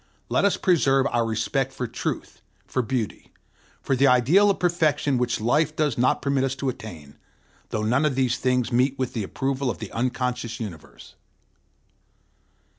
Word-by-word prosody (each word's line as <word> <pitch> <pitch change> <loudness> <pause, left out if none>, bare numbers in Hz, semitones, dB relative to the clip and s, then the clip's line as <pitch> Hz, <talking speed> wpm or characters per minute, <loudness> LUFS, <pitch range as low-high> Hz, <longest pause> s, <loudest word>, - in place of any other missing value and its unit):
Let - - +2
us 200 - +2
preserve 135 -7 +3
our 120 - +2
respect 115 +4 -1
for 125 - -4
truth, 115 - -5 0.2
for 130 - -1
beauty, 120 -3 -4 0.5
for 135 - +1
the 135 +2 +4
ideal 140 +12 +5
of 200 - +1
perfection 155 -6 +1
which 120 -1 0
life 150 +7 +1
does 150 -5 +1
not 125 +1 +1
permit 140 -1 +1
us 135 0 -1
to 135 0 -2
attain, 80 - -9 0.5
though 110 - -2
none 125 +7 +2
of 145 -4 +1
these 125 -2 +1
things 125 -1 0
meet 130 +3 +2
with 130 -2 -2
the 115 - -2
approval 135 +5 -2
of - - -3
the 110 -4 -8
unconscious 125 -1 -2
universe. 100 -9 -9
130 Hz, 165 wpm, -24 LUFS, 120-140 Hz, 0.5 s, ideal